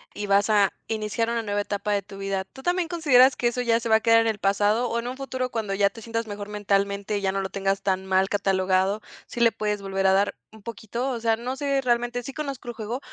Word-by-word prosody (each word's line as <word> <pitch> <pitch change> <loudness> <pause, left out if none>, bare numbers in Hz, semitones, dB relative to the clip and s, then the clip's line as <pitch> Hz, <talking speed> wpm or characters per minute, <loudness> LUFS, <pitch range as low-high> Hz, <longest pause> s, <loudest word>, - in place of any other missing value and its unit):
y 205 - -4
vas 200 +2 +3
a 205 -2 +4
iniciar 220 +1 -1
una 235 0 0
nueva 205 -1 -1
etapa 205 0 -3
de 200 -1 +1
tu 195 +1 -12
vida. 195 -1 -2
¿Tú 265 - -14
también 355 +1 +1
consideras 280 -7 +5
que 240 - 0
eso 240 +1 -1
ya 230 -1 +2
se 235 - -4
va 220 - +6
a - - -3
quedar 230 0 +5
en 225 - 0
el 220 -2 -1
pasado, 205 +5 +2
o 235 - -1
en 235 - -5
un 250 - -4
futuro, 260 -1 -3
cuando 215 -4 -2
ya 200 0 +3
te 225 - -12
sientas 230 +1 -3
mejor 205 0 -6
mentalmente, 200 0 0
y - - -3
ya 190 -1 +1
no 195 0 -1
lo 190 - -4
tengas 195 0 -1
tan 190 -1 0
mal 190 0 +3
catalogado, 190 0 +1 0.3
sí - - -7
le 235 -1 +5
puedes 210 -2 -2
volver 195 0 0
a 190 - +5
dar 200 +1 +2 0.2
un 220 0 -15
poquito? 230 +3 -4
O 245 -3 -3
sea, 225 0 +2
no 250 +3 -4
sé, 275 -1 0
realmente 240 -1 0
sí 275 - -7
conozco 275 -4 -5
el 240 - -4
juego, 225 +2 -4
215 Hz, 265 wpm, -25 LUFS, 200-240 Hz, 0.3 s, va